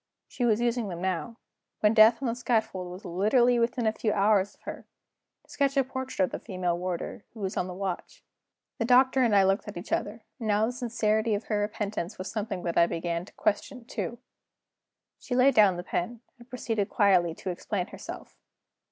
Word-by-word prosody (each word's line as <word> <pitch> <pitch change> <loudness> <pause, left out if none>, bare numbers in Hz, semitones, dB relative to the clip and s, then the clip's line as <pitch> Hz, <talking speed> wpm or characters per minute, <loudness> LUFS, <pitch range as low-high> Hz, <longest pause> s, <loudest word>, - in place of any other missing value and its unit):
She 245 - -2
was 220 -2 +3
using 240 -2 0
them 175 -3 -5
now 190 +6 -2 0.4
when 210 0 +4
death 225 +3 +6
on - - 0
the 230 - 0
scaffold 220 -6 -1
was 185 +3 -10
literally 235 +7 +3
within 235 0 0
a 220 - +3
few 220 -1 -1
hours 205 -1 +2
of - - -34
her - - -8 0.6
to - - -31
sketch 275 -1 0
a 270 - +5
portrait 260 -6 -2
of - - -9
the - - -4
female 185 -4 -2
warder, 180 +3 -4
who - - -10
was 195 -2 -3
on 180 - -1
the 180 - -6
watch! 190 -2 -5 0.6
The 230 - +1
Doctor 260 +2 +5
and 230 -4 +3
I 195 - +6
looked 195 +3 +1
at 205 - -7
each 175 - -8
other; 215 +2 -2 0.2
and 225 - -4
now 210 +1 +3
the 235 - -1
sincerity 225 -3 0
of 205 - -4
her 210 -2 +1
repentance 210 -2 -3
was 185 - -5
something 205 -4 -3
that 170 -1 +1
I 170 - +6
began 170 +1 -3
to - - -17
question, 225 +4 -2
too. 235 0 -4 1.0
She 250 - -4
laid 260 +2 +5
down 200 -4 +5
the 175 - -5
pen, 220 +7 -3 0.2
and 240 +1 -16
proceeded 225 -5 -2
quietly 180 -5 +3
to 185 - -4
explain 180 +1 -3
herself. - - -9
215 Hz, 205 wpm, -28 LUFS, 185-235 Hz, 1.0 s, death